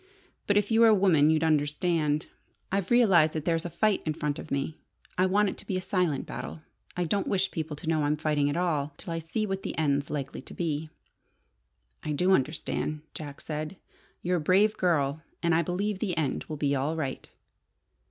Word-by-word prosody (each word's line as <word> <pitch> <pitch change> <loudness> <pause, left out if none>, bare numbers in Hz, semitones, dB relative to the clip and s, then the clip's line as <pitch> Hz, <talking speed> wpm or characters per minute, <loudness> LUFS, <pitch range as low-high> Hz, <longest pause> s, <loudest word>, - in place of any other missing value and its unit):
But 205 - +3
if 205 +1 +1
you 225 - +4
were 230 - +8
a 220 - +7
woman 170 -7 +4
you'd 160 0 +3
understand. 150 0 +1 0.5
I've 195 -1 0
realized 190 -10 +5
that 155 -1 -3
there's 165 -1 +1
a - - -2
fight 215 +3 +1
in 155 -1 -2
front 150 -1 -2
of - - -8
me. 140 +3 -2 0.4
I 185 +1 +3
want 205 +2 +3
it - - -7
to - - -11
be 190 - -1
a - - -2
silent 180 -7 0
battle. 155 - -7 0.3
I 180 - +1
don't 195 +4 0
wish 190 -1 +1
people 160 -2 -4
to 150 - -10
know 160 -1 +2
I'm 150 +1 +1
fighting 150 -2 +1
at 145 - -1
all 150 -5 0
till 170 - -6
I 165 - -2
see 165 +7 -2
what 195 -1 -3
the - - -5
end's 140 -2 +1
likely 140 -2 -4
to - - -11
be." 155 -2 -2 1.1
"I 150 - -2
do 180 +6 +2
understand," 155 -1 0
Jack 145 -3 -8
said. 155 +3 -4 0.5
"You're 180 +1 +1
a - - -2
brave 200 +7 +4
girl, 155 -4 +1 0.2
and 170 0 +3
I 165 - +4
believe 185 +4 -2
the 185 -6 -2
end 145 -5 -1
will 155 - -6
be 140 -1 +1
all 140 +4 0
right." 140 -5 -4
160 Hz, 210 wpm, -28 LUFS, 150-185 Hz, 1.1 s, were